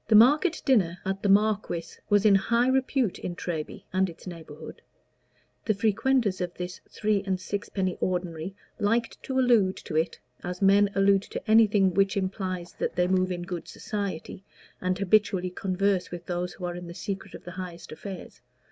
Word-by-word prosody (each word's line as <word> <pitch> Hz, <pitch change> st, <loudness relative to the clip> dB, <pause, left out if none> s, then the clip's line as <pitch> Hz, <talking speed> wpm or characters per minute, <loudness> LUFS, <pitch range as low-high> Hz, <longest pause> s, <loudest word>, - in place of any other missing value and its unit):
The 220 Hz, -, +4 dB
market 295 Hz, -, +5 dB
dinner 190 Hz, -, +3 dB
at 195 Hz, +1 st, -2 dB
"the 205 Hz, -, +1 dB
Marquis" 195 Hz, -5 st, +1 dB
was 205 Hz, 0 st, +4 dB
in 210 Hz, -, +7 dB
high 235 Hz, +5 st, +3 dB
repute 260 Hz, -4 st, +1 dB
in 175 Hz, -, -4 dB
Treby 160 Hz, -3 st, -5 dB
and 190 Hz, 0 st, +2 dB
its 170 Hz, -, -13 dB
neighborhood. 160 Hz, -4 st, -9 dB, 0.8 s
The 215 Hz, -, +2 dB
frequenters 220 Hz, -1 st, +1 dB
of 180 Hz, -1 st, -3 dB
this 180 Hz, 0 st, -6 dB
three 210 Hz, -2 st, 0 dB
and 190 Hz, -2 st, -1 dB
sixpenny 190 Hz, -2 st, -3 dB
ordinary 180 Hz, 0 st, -2 dB, 0.2 s
liked 230 Hz, +2 st, 0 dB
to 265 Hz, -, -3 dB
allude 235 Hz, -7 st, +4 dB
to 155 Hz, -, -7 dB
it, 160 Hz, +2 st, 0 dB, 0.2 s
as 180 Hz, 0 st, -4 dB
men 200 Hz, +1 st, +5 dB
allude 195 Hz, 0 st, +4 dB
to -, -, -5 dB
anything 210 Hz, -4 st, +5 dB
which 195 Hz, +2 st, +2 dB
implies 185 Hz, -2 st, -3 dB
that -, -, -1 dB
they 180 Hz, 0 st, +2 dB
move 185 Hz, 0 st, +2 dB
in 175 Hz, -1 st, -3 dB
good 175 Hz, -2 st, -5 dB
society, 200 Hz, -4 st, -5 dB, 0.4 s
and 185 Hz, 0 st, 0 dB
habitually 200 Hz, -2 st, +2 dB
converse 190 Hz, 0 st, 0 dB
with 175 Hz, -1 st, -7 dB
those 175 Hz, 0 st, -3 dB
who 180 Hz, -, -6 dB
are 175 Hz, 0 st, -3 dB
in 175 Hz, 0 st, -7 dB
the 170 Hz, -, -8 dB
secret 195 Hz, +2 st, -5 dB
of -, -, -10 dB
the 175 Hz, -, -8 dB
highest 180 Hz, -2 st, -7 dB
affairs. 180 Hz, +4 st, -8 dB
190 Hz, 175 wpm, -27 LUFS, 180-210 Hz, 0.8 s, in